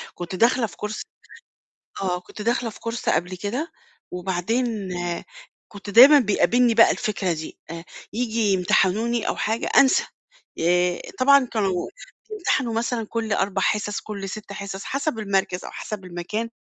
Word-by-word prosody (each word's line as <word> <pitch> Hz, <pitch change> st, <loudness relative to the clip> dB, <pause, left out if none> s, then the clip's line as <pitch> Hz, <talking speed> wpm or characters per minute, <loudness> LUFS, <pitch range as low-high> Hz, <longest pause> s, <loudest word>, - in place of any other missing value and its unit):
كنت 175 Hz, +1 st, -6 dB
داخلة 230 Hz, +2 st, +3 dB
في -, -, -14 dB
course 210 Hz, +1 st, -4 dB, 1.0 s
آه، 180 Hz, -2 st, 0 dB
كنت 210 Hz, -, -10 dB
داخلة 235 Hz, 0 st, 0 dB
في -, -, -15 dB
course 230 Hz, 0 st, -4 dB
قبل 180 Hz, +2 st, -1 dB
كده، 240 Hz, -, -4 dB, 0.4 s
وبعدين 195 Hz, +4 st, -2 dB, 0.8 s
كنت 205 Hz, 0 st, -9 dB
دايمًا 265 Hz, +8 st, +9 dB
بيقابلني 240 Hz, +1 st, +3 dB
بقى 230 Hz, -, +7 dB
الفكرة 195 Hz, -4 st, -1 dB
دي، 160 Hz, -1 st, -7 dB
آآ، 165 Hz, 0 st, -7 dB, 0.3 s
ييجي 230 Hz, +1 st, -1 dB
يمتحنوني 205 Hz, +5 st, +1 dB
أو -, -, -1 dB
حاجة 220 Hz, +2 st, -1 dB
أنسى، 270 Hz, -1 st, +5 dB, 0.5 s
آآ 175 Hz, +1 st, +2 dB, 0.2 s
طبعًا 275 Hz, 0 st, +5 dB
كانوا 195 Hz, -5 st, 0 dB, 0.4 s
بيمتحنوا 265 Hz, -, 0 dB
مثلًا 230 Hz, 0 st, -1 dB
كل 225 Hz, -1 st, -3 dB
4 200 Hz, -1 st, 0 dB
حصص، 210 Hz, -1 st, 0 dB
كل 200 Hz, -2 st, -6 dB
6 205 Hz, +1 st, -7 dB
حصص 195 Hz, 0 st, -6 dB
حسب 280 Hz, -2 st, -2 dB
المركز 195 Hz, -3 st, -1 dB
أو -, -, -7 dB
حسب 210 Hz, -3 st, -6 dB
المكان 180 Hz, +6 st, -4 dB
210 Hz, 145 wpm, -23 LUFS, 190-235 Hz, 1.0 s, دايمًا